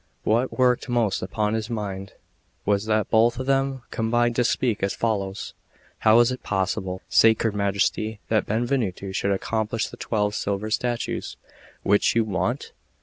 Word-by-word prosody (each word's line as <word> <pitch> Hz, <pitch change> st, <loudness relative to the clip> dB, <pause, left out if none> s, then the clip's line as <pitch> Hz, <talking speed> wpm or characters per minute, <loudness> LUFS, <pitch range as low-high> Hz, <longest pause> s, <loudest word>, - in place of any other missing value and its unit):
What 120 Hz, +4 st, +1 dB
worked 125 Hz, 0 st, +2 dB
most 115 Hz, -5 st, +1 dB
upon 105 Hz, +3 st, -1 dB
his 110 Hz, 0 st, -2 dB
mind 100 Hz, -3 st, -4 dB, 0.5 s
was 100 Hz, 0 st, +1 dB
that 110 Hz, -2 st, 0 dB
both 115 Hz, +1 st, +4 dB
of 130 Hz, -, -3 dB
them 135 Hz, -1 st, 0 dB
combined 120 Hz, +1 st, +1 dB
to 125 Hz, -, +4 dB
speak 120 Hz, -2 st, 0 dB
as 100 Hz, -, 0 dB
follows: 100 Hz, -4 st, -2 dB, 0.5 s
"How 110 Hz, +1 st, +6 dB
is 120 Hz, +1 st, +3 dB
it 130 Hz, -, -5 dB
possible, 95 Hz, -1 st, -2 dB
sacred 110 Hz, -1 st, +4 dB
Majesty, 105 Hz, +2 st, 0 dB
that 110 Hz, -1 st, +1 dB
Benvenuto 110 Hz, -4 st, -1 dB
should 100 Hz, -, -1 dB
accomplish 110 Hz, +3 st, -1 dB
the -, -, -11 dB
twelve 105 Hz, -3 st, -1 dB
silver 100 Hz, +1 st, -2 dB
statues 120 Hz, +1 st, -2 dB, 0.5 s
which 100 Hz, +3 st, +3 dB
you 115 Hz, -, +4 dB
want? 105 Hz, +5 st, -2 dB
110 Hz, 150 wpm, -24 LUFS, 100-120 Hz, 0.5 s, How